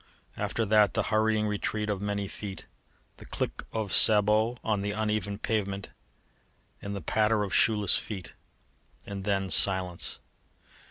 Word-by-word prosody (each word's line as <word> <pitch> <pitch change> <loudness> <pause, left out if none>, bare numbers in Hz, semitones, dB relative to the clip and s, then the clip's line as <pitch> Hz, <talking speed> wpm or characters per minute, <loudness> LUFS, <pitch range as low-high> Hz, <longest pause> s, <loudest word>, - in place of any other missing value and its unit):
After 115 - -2
that 105 -2 +3
the - - +1
hurrying 110 0 +2
retreat 105 +1 -3
of 100 -2 -3
many 100 -1 -3
feet, 100 -1 -8 0.5
the - - -13
click - - -4
of 110 -3 -3
sabots 110 +3 +6
on 105 -3 -1
the 100 0 -3
uneven 105 -2 -2
pavement 100 -3 -3 0.9
and 100 -1 -6
patter 110 -1 +1
of 100 - -5
shoeless 105 -4 +3
feet, 95 -5 -8 0.7
and 100 -1 -7
then 95 -2 -1
silence. 95 -3 +2
105 Hz, 130 wpm, -28 LUFS, 100-110 Hz, 0.9 s, sabots